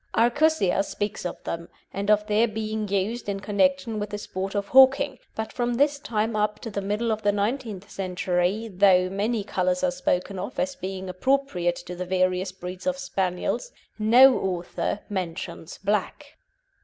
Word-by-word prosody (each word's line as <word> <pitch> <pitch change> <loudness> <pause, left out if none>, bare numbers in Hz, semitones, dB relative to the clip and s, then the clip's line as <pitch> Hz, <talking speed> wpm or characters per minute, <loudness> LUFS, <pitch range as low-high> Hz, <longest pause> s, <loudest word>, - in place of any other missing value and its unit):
Arcussia 240 - +3
speaks 205 -2 -3
of - - -9
them, 170 0 -5 0.2
and 200 +1 -3
of 210 0 +4
their 215 +2 +3
being 215 0 -3
used 205 +4 -1
in 195 0 -2
connection 230 +3 +1
with 205 0 -3
the 205 - -4
sport 195 -1 -5
of 200 0 -2
hawking, 265 +1 +5 0.2
but 220 0 -4
from 240 -1 -1
his 285 +1 +2
time 220 -4 -1
up 210 0 0
to 225 - -7
the 200 - -2
middle 210 +4 -1
of 215 0 -1
the 205 -1 +3
nineteenth 205 -1 -2
century, 185 +2 -1
though 185 -2 +4
many 210 +3 -1
colours 185 -2 0
are 180 - +3
spoken 180 +1 -1
of 215 +8 -6
as 275 0 -1
being 190 -5 -5
appropriate 185 -3 0
to 180 +1 -8
the 180 - -4
various 185 0 0
breeds 185 +4 -7
of 275 0 +1
Spaniels, 195 - -2 0.3
no 245 +5 +7
author 180 +2 -2
mentions 175 -3 -5
black. 210 +9 -2
205 Hz, 170 wpm, -25 LUFS, 185-235 Hz, 0.3 s, no